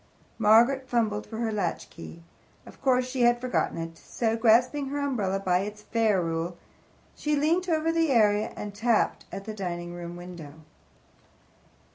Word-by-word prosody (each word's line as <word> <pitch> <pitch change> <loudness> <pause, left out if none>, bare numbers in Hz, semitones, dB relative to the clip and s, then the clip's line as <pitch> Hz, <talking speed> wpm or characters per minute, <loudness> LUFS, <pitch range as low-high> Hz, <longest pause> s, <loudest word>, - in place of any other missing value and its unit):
Margaret 240 +5 +4
fumbled 215 -3 0
for 220 - -7
her 230 -1 -1
latchkey. 170 -4 -5 0.4
Of - - -15
course 255 -2 +2
she 255 0 -3
had 240 0 +4
forgotten 250 -7 -1
it. 165 0 -6
So, 225 -2 -1
grasping 250 +5 +3
her 285 +2 -3
umbrella 215 -9 -1
by 180 -2 +1
its 210 +2 -6
ferrule, 175 -7 0 0.6
she 300 0 0
leant 335 +5 +1
over 320 0 +1
the 330 -1 +1
area 215 -4 +3
and 205 -1 -6
tapped 225 +2 +1
at 195 0 -7
the 220 - -5
dining 175 -4 -5
room 175 0 -7
window. 175 -4 -9
220 Hz, 150 wpm, -27 LUFS, 180-255 Hz, 0.6 s, Margaret